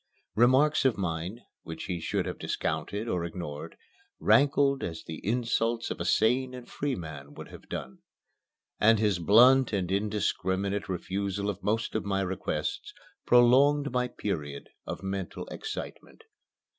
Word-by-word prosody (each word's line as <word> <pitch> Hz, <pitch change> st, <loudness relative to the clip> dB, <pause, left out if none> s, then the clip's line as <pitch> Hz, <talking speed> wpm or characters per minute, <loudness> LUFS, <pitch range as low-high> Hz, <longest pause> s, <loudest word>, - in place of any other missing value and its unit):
Remarks 130 Hz, +6 st, +4 dB
of 130 Hz, -4 st, +2 dB
mine, 90 Hz, +4 st, -3 dB, 0.2 s
which 80 Hz, 0 st, -7 dB
he 90 Hz, -3 st, -3 dB
should -, -, -1 dB
have -, -, -5 dB
discounted 105 Hz, +3 st, -3 dB
or 90 Hz, -6 st, -1 dB
ignored, 80 Hz, -2 st, -6 dB, 0.4 s
rankled 140 Hz, -1 st, +4 dB
as 80 Hz, -2 st, -5 dB
the 80 Hz, -, -8 dB
insults 115 Hz, +1 st, 0 dB
of -, -, -4 dB
a -, -, -3 dB
sane 125 Hz, +3 st, +2 dB
and 125 Hz, -1 st, -10 dB
free 140 Hz, -2 st, -2 dB
man 75 Hz, -4 st, -8 dB
would -, -, -9 dB
have -, -, -13 dB
done. 65 Hz, -, -6 dB, 0.8 s
And 115 Hz, +1 st, +5 dB
his 105 Hz, -4 st, +1 dB
blunt 125 Hz, +8 st, +6 dB
and 95 Hz, -3 st, -1 dB
indiscriminate 100 Hz, -1 st, -1 dB
refusal 100 Hz, +2 st, -2 dB
of 100 Hz, 0 st, -11 dB
most 110 Hz, +3 st, -1 dB
of 110 Hz, -, -1 dB
my 100 Hz, -1 st, 0 dB
requests 90 Hz, -5 st, -3 dB, 0.3 s
prolonged 135 Hz, +4 st, +5 dB
my 125 Hz, 0 st, 0 dB
period 75 Hz, -12 st, -5 dB, 0.2 s
of -, -, -5 dB
mental 95 Hz, -1 st, -4 dB
excitement. 440 Hz, +1 st, -7 dB
105 Hz, 145 wpm, -28 LUFS, 90-125 Hz, 0.8 s, blunt